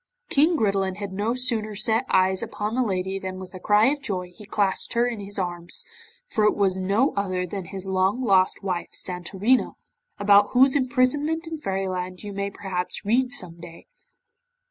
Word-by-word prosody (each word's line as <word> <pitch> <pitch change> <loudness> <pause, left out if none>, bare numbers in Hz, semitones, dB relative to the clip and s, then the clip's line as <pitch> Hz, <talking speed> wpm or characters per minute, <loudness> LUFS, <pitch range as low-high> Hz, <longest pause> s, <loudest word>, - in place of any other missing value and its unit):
King 315 +4 +3
Gridelin 195 -5 +1
had 200 -2 -5
no 210 +5 -1
sooner 230 -4 0
set 225 +4 +1
eyes 190 0 +3
upon 210 +1 -4
the 255 - +1
lady 190 -3 -1
than 185 -1 -6
with 185 0 -10
a 185 - -8
cry 210 +3 +4
of 290 -1 -3
joy 185 -9 -4
he 210 - -13
clasped 200 -2 0
her 235 0 +3
in 240 -3 -3
his 200 0 -6
arms, 175 -2 -1 0.4
for 220 - 0
it 210 - +3
was 190 -2 +1
no 200 +9 +2
other 185 -2 -1
than 190 +1 -6
his 190 +2 -7
long 190 +4 +1
lost 190 -3 +3
wife, 180 -3 -2
Santorina, 190 +7 0 0.4
about 205 0 +5
whose 260 +2 +5
imprisonment 285 +5 +1
in 325 -1 -6
Fairyland 185 -4 -3
you 205 -1 -6
may 200 0 -2
perhaps 190 -2 -5
read 250 +4 +2
some 180 -11 -2
day. 170 -1 -12
200 Hz, 180 wpm, -24 LUFS, 185-235 Hz, 0.4 s, about